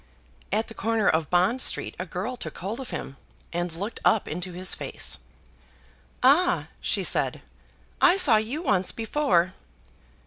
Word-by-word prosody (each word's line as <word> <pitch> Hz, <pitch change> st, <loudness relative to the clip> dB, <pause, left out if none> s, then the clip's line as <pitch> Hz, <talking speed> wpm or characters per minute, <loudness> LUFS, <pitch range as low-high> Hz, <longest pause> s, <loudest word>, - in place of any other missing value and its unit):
At 215 Hz, +3 st, 0 dB
the -, -, -10 dB
corner 225 Hz, -2 st, 0 dB
of 160 Hz, -2 st, +2 dB
Bond 185 Hz, +9 st, +2 dB
Street, -, -, +1 dB
a 185 Hz, -, -4 dB
girl 190 Hz, +9 st, -4 dB
took 160 Hz, -10 st, -6 dB
hold 205 Hz, +7 st, -5 dB
of 260 Hz, -2 st, -6 dB
him, 135 Hz, -, -6 dB, 0.4 s
and 175 Hz, 0 st, -2 dB
looked 200 Hz, +8 st, -5 dB
up 220 Hz, -, +3 dB
into 180 Hz, +3 st, -4 dB
his 185 Hz, +1 st, 0 dB
face. 65 Hz, -, -1 dB, 1.0 s
"Ah!" 355 Hz, +8 st, +4 dB
she -, -, 0 dB
said, -, -, 0 dB, 0.6 s
"I 360 Hz, +2 st, +6 dB
saw 270 Hz, -, +6 dB
you 240 Hz, +10 st, -2 dB
once 195 Hz, -, +2 dB
before." 205 Hz, -, +1 dB
210 Hz, 150 wpm, -26 LUFS, 180-250 Hz, 1.0 s, I